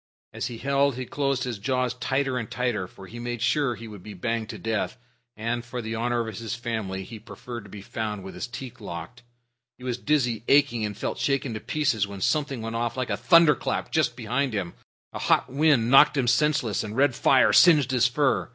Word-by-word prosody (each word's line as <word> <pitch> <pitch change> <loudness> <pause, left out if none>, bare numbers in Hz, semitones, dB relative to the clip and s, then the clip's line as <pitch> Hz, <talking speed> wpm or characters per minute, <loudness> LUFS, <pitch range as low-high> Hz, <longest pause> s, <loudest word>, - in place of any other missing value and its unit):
As - - -3
he 120 -2 -7
held 140 +1 +1
he 130 0 -4
closed 140 -1 -1
his 120 -5 -4
jaws 125 +3 0
tighter 135 +1 -1
and 115 - -6
tighter, 120 -7 -1
for 95 - -13
he 120 +5 -10
made 120 0 -4
sure 135 +1 +1
he 115 +1 -9
would 105 -3 -10
be 105 +2 -9
banged 115 +3 -2
to - - -6
death, 115 +3 -2 0.4
and, 115 +2 -2
for 125 0 -6
the 110 -1 -4
honor 120 0 -1
of 110 - -6
his 115 0 -4
family, 110 -6 -4
he 110 +3 -9
preferred 120 0 -9
to - - -13
be 100 0 -9
found 105 -2 -4
with 95 - -8
his - - -5
teeth 125 -1 -9
locked. 85 +6 -7 0.6
He 125 - -15
was 125 -1 -3
dizzy, 125 -6 +1
aching, 140 -5 +4
and 105 -1 -3
felt - - -3
shaken 135 -3 0
to 110 - -4
pieces 125 -6 0
when 100 -1 -8
something 140 - 0
went 115 0 -4
off 120 +1 -2
like 130 -1 -2
a - - +1
thunderclap 150 +4 +3
just 155 -6 +1
behind 125 +2 -1
him. 90 -4 -3 0.4
A - - -5
hot - - +2
wind 140 -5 +3
knocked 150 +2 +7
him 130 - +2
senseless 125 -3 +2
and 110 +2 -6
red 140 -1 +4
fire 130 +2 +4
singed 150 -7 +6
his 125 -2 +4
fur. 135 +2 +1
120 Hz, 215 wpm, -26 LUFS, 110-135 Hz, 0.6 s, knocked